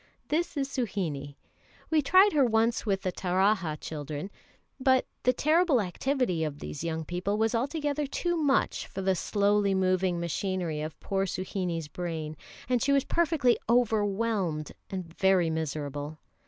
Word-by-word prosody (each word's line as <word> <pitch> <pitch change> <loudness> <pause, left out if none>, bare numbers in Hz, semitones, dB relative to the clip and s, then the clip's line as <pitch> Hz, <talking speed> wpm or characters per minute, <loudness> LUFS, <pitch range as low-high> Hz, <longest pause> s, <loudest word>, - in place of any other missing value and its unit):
This 325 0 0
is 275 -1 0
Suhinie. 180 - -3 0.6
We 315 -1 +4
tried 375 +8 +5
her 290 -3 +4
once 230 -1 +2
with 195 -1 0
the 185 - 0
Taraha 185 -2 +1
children; 150 +4 -5 0.5
but 260 -1 +3 0.2
the 250 - +4
terrible 310 +1 +3
activity 200 - 0
of 150 -2 -3
these 145 0 -6
young 160 -1 -2
people 180 +5 -2
was 225 +1 +1
altogether 290 +3 -1
too 345 +5 -1
much 290 -5 +1
for 195 - -5
the 190 0 +3
slowly 200 +1 +2
moving 185 -1 +1
machinery 170 -2 -2
of 155 0 -6
poor 195 0 -1
Suhinie's 180 -3 -3
brain, 160 -1 -4 0.3
and 250 -1 +1
she 280 - +2
was 275 -1 +4
perfectly 315 -8 +2
overwhelmed 210 -8 +1 0.2
and 180 -3 -6
very 190 -4 +4
miserable. 150 -1 -4
195 Hz, 145 wpm, -28 LUFS, 165-250 Hz, 0.6 s, tried